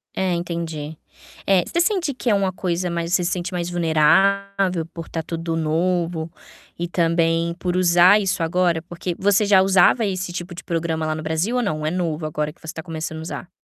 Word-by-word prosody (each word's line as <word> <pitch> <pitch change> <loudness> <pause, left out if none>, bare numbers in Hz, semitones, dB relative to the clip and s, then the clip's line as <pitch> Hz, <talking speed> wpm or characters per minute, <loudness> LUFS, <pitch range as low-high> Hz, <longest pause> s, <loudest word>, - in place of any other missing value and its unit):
É, 185 -2 0
entendi. 165 -3 -4 0.5
É, 190 -2 +4
você 340 - 0
sente 350 -6 +1
que 245 -1 -2
é 210 - +4
uma 195 -1 +1
coisa 180 -1 -2
mais 170 0 -2
você 180 - +3
se 170 - -1
sente 180 +1 -3
mais 175 -1 -2
vulnerável 180 +2 +2
por 165 -1 -8
tá 165 - -3
tudo 165 0 -4
novo 165 +1 -1 0.5
e 175 +1 -3
também 165 0 +1
por 180 -1 -2
usar 180 +2 +6
isso 195 -3 -1
agora? 170 0 +1
Porque 175 +1 -5
você 200 +1 +3
já 200 -2 +5
usava 195 +4 +4
esse 185 -2 -3
tipo 175 0 -6
de 175 - -9
programa 165 -1 -2
lá 155 0 -1
no 155 - -6
Brasil 160 +9 -1
ou 250 - +2
não? 155 -7 -2
É - - +1
novo, 165 -3 -2
agora 150 0 -2
que - - -31
você 160 0 -7
tá 160 - -7
começando 160 -1 -5
a - - -6
usar? 175 +2 -7
175 Hz, 205 wpm, -22 LUFS, 165-185 Hz, 0.5 s, usar